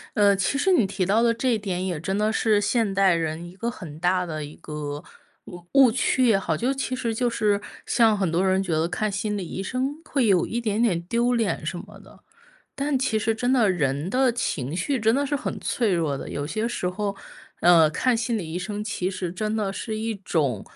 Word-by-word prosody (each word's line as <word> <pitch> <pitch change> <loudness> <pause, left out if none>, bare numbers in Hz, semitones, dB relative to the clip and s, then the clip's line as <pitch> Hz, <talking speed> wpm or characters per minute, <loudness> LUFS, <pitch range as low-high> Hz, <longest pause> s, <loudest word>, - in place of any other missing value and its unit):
呃， 200 -2 +5
其 195 +8 0
实 380 +7 +2
你 240 - +4
提 190 -1 -2
到 215 +5 +3
的 230 -1 +4
这 250 +1 0
一 - - +2
点 185 -3 -3
也 175 -5 -2
真 190 +4 -2
的 210 +1 +1
是 220 -1 +2
现 220 -1 +1
代 195 -2 +4
人 160 0 -2
一 180 - -15
个 230 +5 -2
很 155 -9 -9
大 180 +1 +1
的 155 -3 -4
一 145 +1 -9
个 150 -2 -6 0.4
误 175 -1 -11
误 270 -3 +7
区 255 +2 +2
也 215 -4 +5
好， - - -1
就 255 +4 0
其 265 -1 -3
实 235 -3 -2
就 245 +2 +1
是 205 -3 +1 0.2
像 225 -3 +3
很 190 -4 0
多 175 +3 +1
人 190 +1 +2
觉 180 -4 -2
得 160 +2 +1
看 215 +3 -2
心 205 +1 -2
理 180 -4 -4
医 190 - -5
生 260 +7 -2
会 265 -6 +1
有 190 -4 +4
一 235 - -3
点 215 -1 0
点 190 -8 +2
丢 235 +7 +1
脸 210 -10 -1
什 175 +3 -3
么 205 +2 -12
的。 - - -17 0.6
但 275 -1 +1
其 225 -4 0
实 220 +1 0
真 245 +3 -1
的 235 -6 +4
人 150 -1 -1
的 260 +1 +3
情 165 - -2
绪 250 +8 -1
真 220 +1 +3
的 280 +2 +1
是 290 - -2 0.3
脆 225 -5 0
弱 160 -5 0
的， - - -7
有 145 0 -4
些 215 +7 -2
时 210 -6 -2
候， 200 +2 -3 0.4
呃， 170 -3 +6
看 250 +10 +1
心 230 0 -1
理 165 -6 -5
医 175 - -2
生 210 +2 -4
其 190 -4 -2
实 185 -2 -4
真 215 +3 -2
的 200 -3 -1
是 215 +2 -4
一 225 +1 -2
种 150 - -1
205 Hz, 250 characters per minute, -24 LUFS, 175-230 Hz, 0.6 s, 误